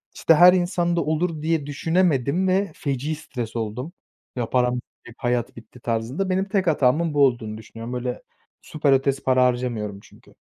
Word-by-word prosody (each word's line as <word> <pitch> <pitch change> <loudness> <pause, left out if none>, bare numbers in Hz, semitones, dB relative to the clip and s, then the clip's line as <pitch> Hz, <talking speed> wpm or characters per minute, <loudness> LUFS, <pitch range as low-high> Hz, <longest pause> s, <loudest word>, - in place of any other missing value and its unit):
işte, 165 - +4
her 180 +3 +8
insanda 175 -1 +1
olur 155 +1 -1
diye 160 -2 0
düşünemedim 160 +2 +1
ve 195 -1 +1
feci 140 +2 -2
stres 125 -7 -7
oldum, 115 +8 -4 0.4
"Ya 120 -2 -3
param 125 -1 +2
bitti, 120 -1 -11
hayat 120 -1 -1
bitti 115 +2 -14
tarzında." 120 +12 -2
Benim 190 +1 +1
tek 190 -2 0
hatamın 155 +2 +2
bu 145 -1 +5
olduğunu 110 -4 -2
düşünüyorum. 115 +2 -9
Böyle 125 0 -4 0.4
süper 145 -2 +1
ötesi 135 +1 +1
para 130 -1 +3
harcamıyorum 120 -5 -2
çünkü. - - -20
135 Hz, 160 wpm, -23 LUFS, 120-165 Hz, 0.4 s, her